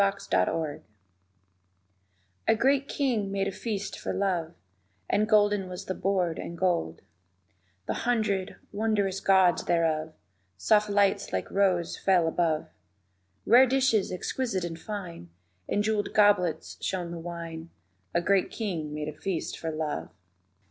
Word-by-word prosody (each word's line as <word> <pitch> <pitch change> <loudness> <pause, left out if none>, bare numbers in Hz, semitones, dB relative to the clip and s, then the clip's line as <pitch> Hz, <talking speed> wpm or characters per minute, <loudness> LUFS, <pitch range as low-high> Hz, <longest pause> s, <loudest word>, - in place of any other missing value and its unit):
THE 195 0 +4
DISCIPLES 145 - -1 1.7
A - - +5
great 275 +4 +2
king 230 -8 0
made 195 0 0
a - - -1
feast 205 0 -4
for - - -3
Love, 175 -4 -1 0.5
And 215 +1 +1
golden 205 -3 +3
was 180 - -7
the 185 - -2
board 185 -4 0
and 170 - -6
gold 165 - 0 0.8
The - - -1
hundred, 215 -5 0 0.2
wondrous 205 -2 0
gauds 190 -3 +4
thereof; 160 -2 +1 0.4
Soft 210 - +3
lights 200 -1 +2
like 95 0 -3
roses 185 -4 +1
fell 180 -4 +3
above 160 -2 0 0.8
Rare 250 +4 +7
dishes 255 -6 +2
exquisite 190 +2 -2
and 165 -1 -5
fine; 180 - -7 0.4
In 205 - +1
jeweled 215 -1 -1
goblets 185 -6 +2
shone 180 -3 -2
the 170 - -5
wine 165 -1 -7 0.5
A 170 - +3
great 195 +1 +2
king 165 -9 -4
made 150 0 -4
a 155 - -4
feast 175 +2 -4
for 165 - -3
Love. 155 -1 -3
190 Hz, 135 wpm, -28 LUFS, 165-205 Hz, 1.7 s, Rare